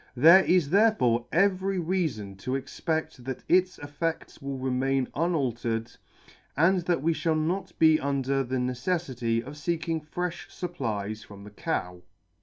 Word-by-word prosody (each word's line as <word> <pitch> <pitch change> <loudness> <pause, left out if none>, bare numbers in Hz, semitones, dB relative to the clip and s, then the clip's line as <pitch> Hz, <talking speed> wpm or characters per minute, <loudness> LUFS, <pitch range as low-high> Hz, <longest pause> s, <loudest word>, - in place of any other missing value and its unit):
There 165 +9 +8
is 175 -6 +2
therefore 180 - +3
every 195 +2 +2
reafon 160 - -2
to 125 +6 -3
exped 150 +5 -2
that 130 +1 -6
its 185 +1 +3
effeds 145 +3 -4
will 135 0 -4
remain 130 0 0
unaltered, 120 -9 -1 0.7
and 180 +4 +4
that 175 -6 0
we 165 +1 +3
lliall 160 -1 0
not 175 +5 -2
be 160 -1 +5
under 140 -1 0
the 130 +1 -2
neceflity 125 -3 -1
of 140 - -8
feeking 165 +1 -2
frefh 175 +3 -4
fupplies 110 - -4
from 100 -1 -12
the 105 - -11
cow. 90 -3 -3
145 Hz, 140 wpm, -27 LUFS, 125-170 Hz, 0.7 s, There